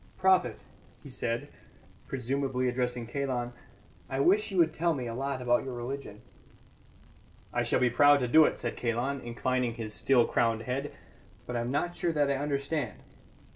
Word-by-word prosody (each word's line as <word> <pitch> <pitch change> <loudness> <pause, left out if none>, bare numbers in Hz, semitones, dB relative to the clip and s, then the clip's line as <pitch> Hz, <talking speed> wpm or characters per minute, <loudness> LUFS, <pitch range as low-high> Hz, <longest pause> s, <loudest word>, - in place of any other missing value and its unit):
"Prophet," 185 -1 +3 0.5
he 140 - -10
said, 120 -2 -2 0.6
presumably 130 0 -1
addressing 125 -1 -1
Kalon, 125 -1 -2 0.6
"I 135 - -2
wish 200 +10 +3
you 195 - -4
would 165 -2 +4
tell 170 0 +1
me 130 -3 -4
a 115 - -4
lot 135 +1 -3
about 120 0 +2
your 130 -2 -5
religion." 120 -3 -6 1.3
"I - - +1
shall - - +1
be 125 -1 +3
proud 145 +4 +6
to 125 - 0
do 155 +5 +7
it," - - 0
said 120 - -3
Kalon, 125 +4 -1
inclining 120 0 -1
his 110 -3 -5
still 125 0 +3
crowned 115 -1 +1
head, 135 +4 -3 0.5
"but 125 - -5
I - - +1
am 120 - -3
not 175 +6 -1
sure 170 - -1
that 145 -2 +2
I - - +1
understand." 140 -2 -2
130 Hz, 175 wpm, -29 LUFS, 120-140 Hz, 1.3 s, do